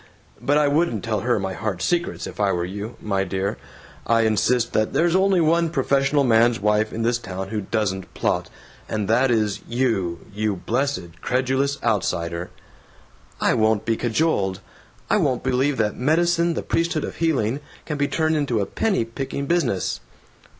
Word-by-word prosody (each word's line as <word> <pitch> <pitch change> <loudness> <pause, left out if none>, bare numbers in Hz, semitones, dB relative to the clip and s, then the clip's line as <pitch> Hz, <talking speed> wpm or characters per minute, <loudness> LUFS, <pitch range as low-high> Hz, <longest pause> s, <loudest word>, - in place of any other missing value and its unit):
But 145 +1 +2
I 150 -1 +4
wouldn't 145 - +1
tell 110 -2 -1
her 120 +3 +1
my 95 -1 -3
heart's 95 -3 -3
secrets 170 -1 -1
if - - -9
I 100 -1 +3
were 85 -1 -1
you, 100 +5 -6
my 100 -2 0
dear. 95 0 -2 0.5
I 115 0 +4
insist 115 +2 +2
that 110 0 +1
there's 170 +1 +2
only 190 -1 +4
one 165 +1 +3
professional 140 -1 +2
man's 115 -2 +4
wife 105 +1 +1
in 115 - -3
this 120 +1 +1
town 95 -2 -6
who 110 0 -2
doesn't 95 -2 -2
plot, - - 0 0.4
and 105 -2 -2
that 125 +4 +3
is 110 -4 +1
you, 110 -9 0
you 105 0 -1
blessed, 95 -5 -2
credulous 135 +2 0
outsider!" 90 -6 -1 0.9
"I - - +3
won't 110 -1 +2
be 115 - +1
cajoled! 110 - 0 0.5
I - - +3
won't 125 - 0
believe 130 +2 +1
that 105 -2 0
medicine, 170 +4 +2
the - - -3
priesthood 165 -2 0
of - - -6
healing, 140 -7 +1 0.3
can 150 -2 -4
be 145 - +2
turned 160 +1 +1
into 140 -7 0
a 100 - 0
penny 195 - 0
picking 135 +4 -4
business." 130 - 0
115 Hz, 170 wpm, -23 LUFS, 105-145 Hz, 0.9 s, I